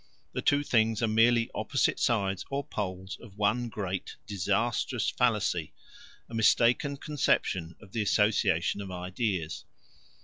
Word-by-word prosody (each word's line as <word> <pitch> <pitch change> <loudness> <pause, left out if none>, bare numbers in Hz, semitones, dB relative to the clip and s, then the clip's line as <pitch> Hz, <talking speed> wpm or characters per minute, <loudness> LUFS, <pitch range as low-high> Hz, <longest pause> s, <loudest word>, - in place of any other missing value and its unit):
The - - -2
two 145 0 +3
things 115 -4 +2
are - - +3
merely 115 +2 +3
opposite - - 0
sides 100 -4 +1
or 140 +1 -2
poles 95 -5 -5
of 105 -4 -14
one 115 +4 +1
great 95 -4 -4
disastrous 105 +5 0
fallacy, 105 -9 0 0.5
a - - -14
mistaken 120 +5 +3
conception 95 - 0
of 100 -4 -16
the 115 - -1
association 100 -3 +2
of 100 - -7
ideas. 90 -2 -3
105 Hz, 130 wpm, -29 LUFS, 95-120 Hz, 0.5 s, two